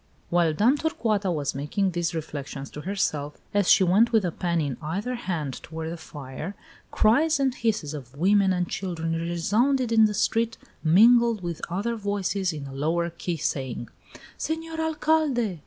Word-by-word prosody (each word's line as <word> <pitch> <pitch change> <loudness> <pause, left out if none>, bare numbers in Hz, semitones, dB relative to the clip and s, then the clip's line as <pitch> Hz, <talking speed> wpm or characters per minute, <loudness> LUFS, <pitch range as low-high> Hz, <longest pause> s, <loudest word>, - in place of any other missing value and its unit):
XIV. - - -36
While 170 -2 +3
Dame 235 - +3
Torcuata 215 - 0
was 145 -4 -1
making 150 +8 -1
these 170 -1 -2
reflections 145 -3 -6
to 150 - -7
herself, 150 -6 -2 0.2
as 205 -2 +2
she - - +7
went, 205 +7 +4
with 220 -5 +3
a 175 - 0
pan 170 0 -1
in 140 -5 -2
either 195 +11 -3
hand, 170 - -4
toward 160 +1 -6
the - - -4
fire, 150 +2 -8 0.3
cries 290 +8 +3
and 270 -2 +2
hisses 215 - -1
of 135 -2 -9
women 195 +3 +4
and 180 -1 0
children 165 -4 -3
resounded 210 +10 +1
in 220 -1 +6
the 210 -1 0
street, 225 +2 +1 0.3
mingled 225 +5 +5
with 170 -2 -4
other 205 +7 -1
voices 200 -3 -1
in 150 -3 -6
a 135 - -8
lower 165 +5 0
key, 170 0 -4
saying: 130 -5 -3 0.5
"Senor 320 0 -3
Alcalde! 305 - +1
185 Hz, 170 wpm, -26 LUFS, 160-225 Hz, 0.5 s, she